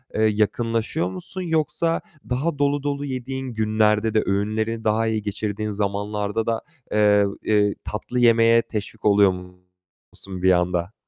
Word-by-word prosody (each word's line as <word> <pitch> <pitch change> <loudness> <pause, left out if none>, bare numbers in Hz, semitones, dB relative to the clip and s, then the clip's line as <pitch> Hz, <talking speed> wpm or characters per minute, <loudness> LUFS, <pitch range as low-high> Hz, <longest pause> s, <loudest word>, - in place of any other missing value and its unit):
eee, 110 - 0
yakınlaşıyor 110 -2 0
musun, 95 - -7
yoksa 165 0 0 0.3
daha 140 +4 -1
dolu 145 0 +1
dolu 145 0 -2
yediğin 130 0 -4
günlerde 110 0 +2
de 110 - +3
öğünleri 110 +3 -1
daha 110 +1 +1
iyi 110 -1 0
geçirdiğin 105 +1 -3
zamanlarda 105 +1 -2
da, 115 -1 0 0.3
eee, 105 -1 +4 0.2
eee, 105 -1 +2
tatlı 115 +4 -4
yemeye 115 -1 +5
teşvik 105 -2 -6
oluyor 100 -2 +5
musun 90 +1 -11
bir 95 0 +5
anda? 90 +1 0
110 Hz, 135 wpm, -23 LUFS, 100-115 Hz, 0.3 s, yemeye